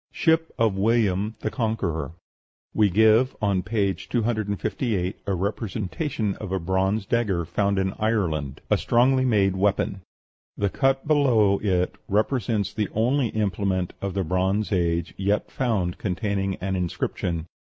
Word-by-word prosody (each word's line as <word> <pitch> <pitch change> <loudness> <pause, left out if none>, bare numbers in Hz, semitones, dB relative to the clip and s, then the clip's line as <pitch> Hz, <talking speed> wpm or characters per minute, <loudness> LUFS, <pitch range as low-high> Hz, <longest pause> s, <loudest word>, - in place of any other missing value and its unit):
SHIP 160 0 +1
OF 115 -4 +2
WILLIAM 105 -1 +1
THE - - -2
CONQUERER. 105 - -2 0.6
We 105 -2 +3
give 110 +6 +4
on 100 -4 +1
page 100 -4 -1
258 110 -3 -1
a 100 - +1
representation 105 - -2
of 105 -3 -7
a 95 - +1
bronze 95 +4 0
dagger 100 -7 0
found 100 +4 0
in 95 0 0
Ireland, 85 -11 -1
a - - +4
strongly 130 +2 +3
made 100 -6 +2
weapon. 100 0 0 0.6
The 100 -1 0
cut 135 0 +1
below 120 -10 +4
it 90 -3 0
represents 105 -2 0
the 105 -3 -1
only 125 +4 +2
implement 100 -4 -1
of 100 -1 -3
the 95 - 0
Bronze 95 +3 0
Age 85 -3 0
yet 100 +2 0
found 105 -9 -1
containing 95 0 -1
an 95 +1 -3
inscription. 85 -2 -2
100 Hz, 135 wpm, -24 LUFS, 95-115 Hz, 0.6 s, give